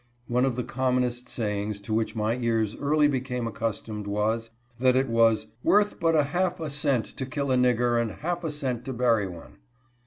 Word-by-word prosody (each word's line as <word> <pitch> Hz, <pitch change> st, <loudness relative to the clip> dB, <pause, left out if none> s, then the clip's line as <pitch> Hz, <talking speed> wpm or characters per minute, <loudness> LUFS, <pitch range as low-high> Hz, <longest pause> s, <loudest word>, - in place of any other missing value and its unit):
One 125 Hz, +2 st, +2 dB
of 130 Hz, -3 st, 0 dB
the 125 Hz, -, -2 dB
commonest 125 Hz, -1 st, -1 dB
sayings 105 Hz, -3 st, -2 dB
to 110 Hz, +2 st, -4 dB
which 110 Hz, 0 st, 0 dB
my 110 Hz, +1 st, 0 dB
ears 115 Hz, -3 st, 0 dB
early 150 Hz, +1 st, +3 dB
became 125 Hz, -3 st, -2 dB
accustomed, 110 Hz, -2 st, -4 dB
was, 110 Hz, +3 st, -1 dB, 0.3 s
that 130 Hz, 0 st, +4 dB
it 130 Hz, +1 st, +2 dB
was 115 Hz, -2 st, +3 dB
" 120 Hz, -, -37 dB
worth 205 Hz, 0 st, +3 dB
but 165 Hz, -2 st, +2 dB
a 150 Hz, -, +5 dB
half 175 Hz, +5 st, -1 dB
a 155 Hz, -3 st, -4 dB
cent 140 Hz, -6 st, +1 dB
to 130 Hz, -, -2 dB
kill 140 Hz, 0 st, -2 dB
a -, -, +4 dB
nigger, 120 Hz, -1 st, +3 dB
and 115 Hz, -, -1 dB
half 175 Hz, +9 st, -4 dB
a 160 Hz, -, -1 dB
cent 130 Hz, -5 st, -2 dB
to 130 Hz, -, -3 dB
bury 115 Hz, -4 st, +2 dB
one." 85 Hz, -3 st, -11 dB
125 Hz, 205 wpm, -26 LUFS, 115-140 Hz, 0.3 s, a